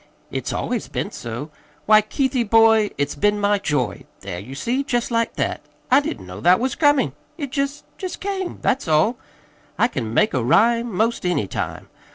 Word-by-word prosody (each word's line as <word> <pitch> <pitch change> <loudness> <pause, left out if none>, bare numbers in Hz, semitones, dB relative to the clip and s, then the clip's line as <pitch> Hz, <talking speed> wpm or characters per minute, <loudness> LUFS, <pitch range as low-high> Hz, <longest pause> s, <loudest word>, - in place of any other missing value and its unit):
It's - - -3
always - - -2
been - - -3
so. 120 +7 -6 0.3
Why, 215 0 +7
Keithie, 250 +1 -1
boy, 225 -1 +5
it's 145 0 -1
been 205 +7 +1
my 205 0 +2
joy 130 - -1 0.2
There, 95 -3 -5
you 125 +8 -9
see 245 - -1
jest 245 -3 -1
like 230 0 0
that! - - -2 0.3
I 265 - +7
didn't 115 - -5
know 90 +2 -9
that 180 +8 +5
was 255 +1 0
comin'. 290 - +3 0.2
It 285 -5 -5
jest 280 +1 -2
jest 370 -2 -5
came. 385 -2 -3
That's 260 -6 +1
all. 160 +10 +3 0.6
I 235 - +4
can 120 - -4
make 210 - +2
a 130 - 0
rhyme 230 - +3
'most 220 +5 0
any 180 - +1
time. - - -5
215 Hz, 185 wpm, -22 LUFS, -, 0.6 s, Why